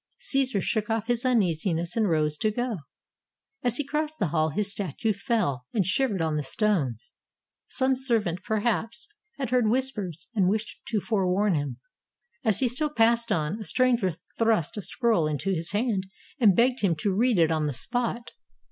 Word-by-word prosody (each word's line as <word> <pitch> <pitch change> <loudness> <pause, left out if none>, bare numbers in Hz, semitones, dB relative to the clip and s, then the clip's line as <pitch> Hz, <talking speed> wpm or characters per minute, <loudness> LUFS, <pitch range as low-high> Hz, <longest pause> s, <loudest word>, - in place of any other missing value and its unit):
Caesar 270 - +1
shook 210 +2 -1
off 225 -1 0
his 240 0 0
uneasiness 175 -8 +1
and 220 -4 +2
rose 155 -2 +1
to 215 +8 0
go. 240 0 -2 0.8
As 245 -1 +2
he 295 - -2
crossed 305 +2 -2
the 190 - 0
hall, 155 0 +1
his 200 +6 0
statue 205 - -1
fell, 195 - -1
and 200 -5 +2
shivered 195 -1 +1
on 160 -1 0
the 150 - 0
stones. 140 - -1 0.6
Some 265 -1 +2
servant^ 225 -9 0
perhaps, 230 +4 -1 0.3
had 265 -4 -3
heard 250 -3 +3
whispers, 215 - -2
and 195 -5 +2
wished 215 +2 -2
to 220 -3 0
forewarn 195 -1 +1
him. 145 -3 -2 0.7
As 215 0 +2
he 260 - +4
still 275 +6 -1
passed 235 -3 +2
on, 165 +2 0
a - - -5
stranger 245 -3 +2 0.3
thrust 220 -8 +2
a 210 - -3
scroll 220 -6 +1
into 155 +6 -2
his 165 -2 -1
hand, 205 -3 0 0.3
and 210 -7 +5
begged 250 +4 +3
him 185 -5 +2
to 185 +5 -1
read 235 +1 +3
it 165 -2 +4
on 155 -2 0
the - - -1
spot. 235 - -2
210 Hz, 175 wpm, -26 LUFS, 170-240 Hz, 0.8 s, and